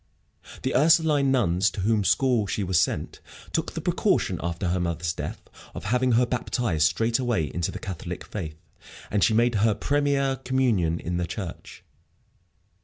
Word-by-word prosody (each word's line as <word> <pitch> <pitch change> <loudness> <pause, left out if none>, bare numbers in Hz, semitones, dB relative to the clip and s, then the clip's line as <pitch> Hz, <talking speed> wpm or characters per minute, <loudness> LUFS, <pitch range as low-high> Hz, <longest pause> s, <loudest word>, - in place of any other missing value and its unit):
The 130 - -1
Ursuline 150 -1 +4
nuns, 105 -6 +2
to 100 - -6
whose 105 0 +2
school 125 -6 +2
she 100 - -2
was 95 -3 +2
sent, - - -1 0.3
took - - -1
the - - -4
precaution, - - +1
after 85 +1 -2
her 90 +1 0
mother's 85 -1 -1
death, - - -5 0.4
of - - -6
having 125 +2 +1
her 125 +2 +4
baptized 115 -9 0
straightway 115 +3 0
into 85 -1 -1
the - - -5
Catholic 95 -4 -6
faith, 80 -7 -6 0.5
and 100 -1 +2
she 110 - +3
made 120 +2 +3
her 110 -1 +3
première 140 -1 0
communion 115 -11 +1
in 85 +1 -3
their 90 -1 -2
church. 90 0 -7
110 Hz, 160 wpm, -25 LUFS, 85-130 Hz, 0.5 s, Ursuline